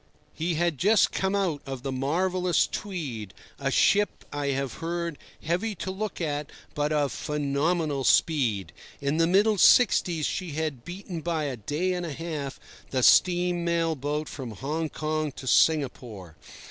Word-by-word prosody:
He 165 +1 -1
had 170 -3 0
just 210 +1 +4
come 190 +1 0
out 180 -7 0
of 135 -2 -6
the 135 - -2
marvellous 180 +7 +1
Tweed, 140 - -5 0.2
a - - 0
ship, 205 -1 +2
I 145 -1 -2
have 135 -1 -1
heard, 170 -1 -3 0.2
heavy 180 +7 -1
to 190 - -4
look 205 +1 -4
at 150 -3 -2 0.2
but 150 +1 -1
of 145 -2 +1
phenomenal 150 0 -1
speed. 125 - +2 0.3
In 140 +2 -1
the 165 0 +3
middle 205 +3 +3
sixties 175 - +5
she 180 -5 -3
had 150 -5 -3
beaten 180 0 -7
by 165 -1 -1
a 140 -3 -2
day 150 - -2
and 180 -1 -3
a 155 - -5
half 150 -3 -5 0.3
the 130 -2 -1
steam 175 +1 +4
mail 165 -1 +1
boat 150 +2 -3
from 130 -4 -7
Hong 150 +8 -3
Kong 155 0 -2
to - - -10
Singapore. 120 - +1
155 Hz, 160 wpm, -27 LUFS, 140-175 Hz, 0.3 s, sixties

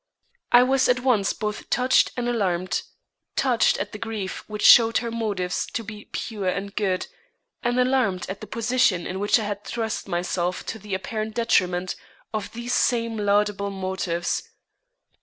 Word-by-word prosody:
I 245 +1 +8
was 260 0 +2
at 250 0 +3
once 235 -7 +2
both 210 -1 -4
touched 250 +1 +3
and 245 -1 -1
alarmed; 185 -6 0 0.5
touched 250 -4 +3
at 200 +1 -4
the 210 - -8
grief 215 -4 -4
which 210 -1 -2
showed 230 -1 +8
her 235 -1 -2
motives 205 -6 -2
to 230 - -2
be 210 -1 -9
pure 210 -5 -4
and 195 +2 -2
good, 190 -3 0 0.6
and 245 +1 0
alarmed 250 -8 +2
at 195 +1 -6
the - - -7
position 230 -6 +1
in 190 +1 -4
which 205 +3 +3
I 220 - -2
had 205 -1 -4
thrust 225 -3 -3
myself 180 0 -2
to 225 - -5
the 205 -1 -4
apparent 215 +3 -4
detriment 185 -6 +1 0.4
of 215 -2 -3
these 240 +1 -3
same 230 -2 +1
laudable 205 -1 +1
motives. 185 -3 -2
210 Hz, 160 wpm, -24 LUFS, 190-235 Hz, 0.6 s, I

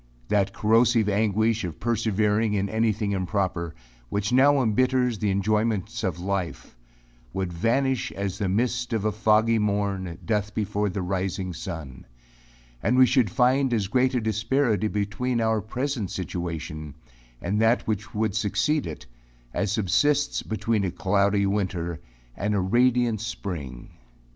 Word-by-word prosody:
That 100 -1 +2
corrosive 115 +1 +3
anguish 110 +2 +1
of 85 -4 -5
persevering 110 -1 +1
in 100 0 0
anything 110 -2 0
improper, 90 -3 -2 0.3
which 105 +3 -1
now 140 +2 +5
embitters 125 0 +1
the 105 - 0
enjoyments 105 +2 0
of 90 -5 -1
life, 90 -8 -3 0.6
would 95 -2 -2
vanish 130 +8 0
as 100 0 -4
the 100 -3 0
mist 120 +4 0
of 110 -2 -1
a 110 - +2
foggy 110 +1 +3
morn 100 -4 -1
doth 105 -1 -1
before 105 -1 0
the 95 0 -3
rising 95 0 -2
sun; 80 -7 -7 0.7
and 125 +3 +2
we 130 - +8
should 125 -4 +2
find 125 +4 +2
as 105 -3 0
great 130 +5 +1
a 125 - +1
disparity 110 0 +1
between 115 +5 -1
our 110 -1 +1
present 120 -2 -3
situation, 80 -5 -5 0.4
and 100 - -1
that 115 +2 +3
which 105 -1 -3
would 110 +1 0
succeed 110 +6 +1
to - - -4
it, 75 -4 -8 0.5
as 100 - -1
subsists 140 +8 +2
between 110 -1 -1
a 95 - 0
cloudy 100 +2 +1
winter, 90 -4 -2 0.4
and 105 +2 -1
a - - +2
radiant 120 +2 +2
spring. 80 - -6
105 Hz, 145 wpm, -25 LUFS, 95-115 Hz, 0.7 s, we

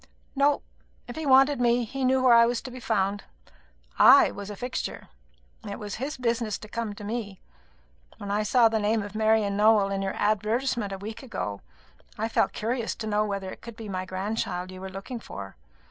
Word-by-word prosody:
"No. 280 +1 +2 0.4
If 240 - -7
he 315 -2 -4
wanted 270 0 +5
me, 240 0 +3
he 270 +4 -4
knew 260 0 +3
where 250 -2 +6
I 235 0 +7
was 240 -1 0
to 255 - -7
be 255 - -8
found. 205 -4 0 0.8
I - - +8
was 200 0 -8
a 205 - -6
fixture. 250 +5 -5 0.6
It 200 - -5
was 205 -1 -6
his 290 +3 -3
business 235 -3 -1
to 215 - -11
come 220 -1 -4
to 205 - -10
me. 205 -3 -4 0.8
When 200 0 -6
I 205 +1 +1
saw 230 +2 +4
the 220 0 0
name 215 +1 +1
of 205 0 -8
Marian 215 -2 +2
Nowell 210 -1 +4
in 195 0 -1
your 195 0 -2
advertisement 215 +1 0
a 195 - -4
week 215 +3 -7
ago, 105 - -5 0.6
I 220 - -1
felt - - +2
curious 230 +1 -2
to 220 - -6
know 210 0 +1
whether 195 -2 -4
it - - -11
could 235 -1 -10
be 225 -1 -8
my 185 -1 -3
grandchild 185 -1 -3
you 185 0 -10
were 190 - -6
looking 195 +6 -7
for. 100 - -9
215 Hz, 205 wpm, -26 LUFS, 200-240 Hz, 0.8 s, I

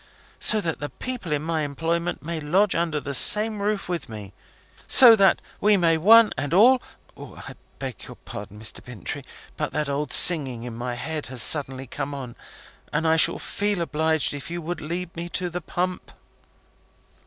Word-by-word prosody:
So 215 - +3
that 165 -4 -4
the 145 - -5
people 250 -10 -6
in 150 0 -1
my 160 -1 -2
employment 165 +4 -3
may 165 +1 -4
lodge 185 +7 +1
under 165 -3 -1
the 140 -1 -6
same 210 +8 +4
roof 205 0 -2
with 175 -7 -5
me! 105 -3 -10 0.5
So 240 -3 +9
that 195 -3 +3 0.2
we 210 0 +3
may 165 -3 +2
one 225 +5 +6
and 145 +4 -2
all 250 +6 +5 0.3
I - - -11 0.2
beg 130 -3 -8
your - - -11
pardon, 105 +1 -11
Mr. 110 - -5
Bintrey, 120 -7 -7 0.4
but - - -4
that 150 -2 -2
old 145 +2 -3
singing 135 -9 +6
in 120 -2 -8
my 120 +1 -5
head 155 +4 -6
has 125 -2 -2
suddenly 135 -3 0
come 140 +3 -6
on, 125 -4 -8 0.6
and 160 +2 -1
I 160 - +3
shall 160 - +3
feel 205 -2 -3
obliged 160 -2 0
if 145 +1 -8
you 175 +1 -5
will 170 +1 -4
lead 170 +2 -7
me 170 +1 -6
to 180 -1 -4
the 180 +1 -5
pump." 180 +3 -4
160 Hz, 180 wpm, -23 LUFS, 140-180 Hz, 0.6 s, So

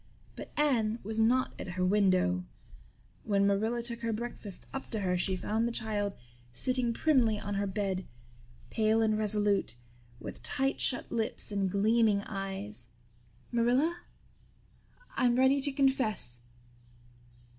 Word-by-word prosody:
But - - -8
Anne 235 -7 +2
was 220 +2 -3
not 245 +3 +3
at 175 - -5
her 185 - +2
window. 185 - +3 0.8
When 200 -1 +2
Marilla 220 +4 +1
took 235 0 -2
her 230 -1 -2
breakfast 220 -3 -3
up 270 - -5
to 220 -3 -1
her 180 -2 +1
she 185 +1 +1
found 220 +5 0
the - - -2
child 210 -3 -2 0.4
sitting 250 - -1
primly 230 -5 +2
on 205 0 -4
her 200 0 0
bed, 190 -2 -2 0.6
pale 220 0 +2
and 215 -1 +2
resolute, 210 - +1 0.4
with - - -8
tight 270 - 0
shut 245 - +1
lips 225 -2 -2
and 200 -2 0
gleaming 210 +1 +3
eyes. 190 - -6 0.6
"Marilla, 250 +9 +2 1.1
I'm 245 -2 +3
ready 265 +2 +4
to 285 +1 +2
confess." 245 - +1
215 Hz, 135 wpm, -31 LUFS, 195-240 Hz, 1.1 s, ready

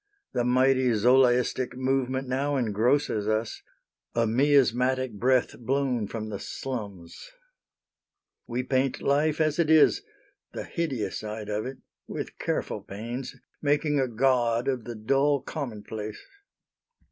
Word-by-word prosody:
The 120 - +1
mighty 130 +1 +3
Zolaistic 125 +2 +3
Movement 130 0 0
now 140 +3 0
Engrosses 115 -1 +1
us 110 +1 -1 0.5
a 115 0 +3
miasmatic 130 0 +2
breath 125 +5 +1
Blown 125 -3 0
from 110 0 -5
the 100 -2 -5
slums. 100 - -7 1.2
We 125 +1 -2
paint 130 0 0
life 150 +3 +2
as 155 0 +1
it 165 -2 +2
is, 160 -1 +5 0.5
The - - -4
hideous 140 -10 -3
side 105 0 -6
of 105 +3 -2
it, 130 0 -7 0.3
with - - -6
careful - - -2
pains, 120 +6 -6 0.3
Making 145 0 +1
a 130 - +2
god 120 0 +1
of 130 -4 -1
the 120 - -6
dull 135 +6 +2
Commonplace. 110 -7 -6
125 Hz, 125 wpm, -27 LUFS, 115-135 Hz, 1.2 s, is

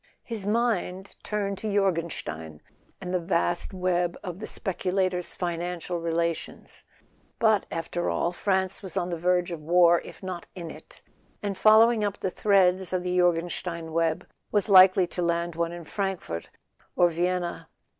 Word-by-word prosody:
His 215 -4 -3
mind 205 -4 -1
turned 200 -2 -3
to 215 - -3
Jorgenstein, 165 - -2 0.4
and 180 -1 -5
the 180 - +2
vast 165 - +1
web 180 -2 0
of 180 -1 -6
the 215 - -5
speculator's 185 -2 -1
financial 175 0 -3
relations. 170 0 -3 0.5
But, 220 -3 +3
after 170 +1 -3
all, 170 - 0
France 190 0 0
was 190 -5 -2
on 175 0 -1
the - - -1
verge 180 +1 +1
of 165 -2 -5
war, 170 +1 +5
if - - -12
not 185 -2 -6
in 170 -3 -6
it; - - -15 0.4
and 200 -1 -2
follow¬ 220 +4 +6
ing 220 -2 -1
up 205 -1 -2
the 190 - -2
threads 190 -2 +3
of 180 -1 0
the 180 0 -1
Jorgenstein 170 -1 0
web 165 -1 0 0.3
was 210 0 +1
likely 185 -1 +7
to 175 +1 -5
land 170 0 0
one 170 0 -1
in 175 -1 -8
Frankfort 190 - -4 0.5
or 175 - +5
Vienna. 175 +1 -2
180 Hz, 155 wpm, -26 LUFS, 170-195 Hz, 0.5 s, likely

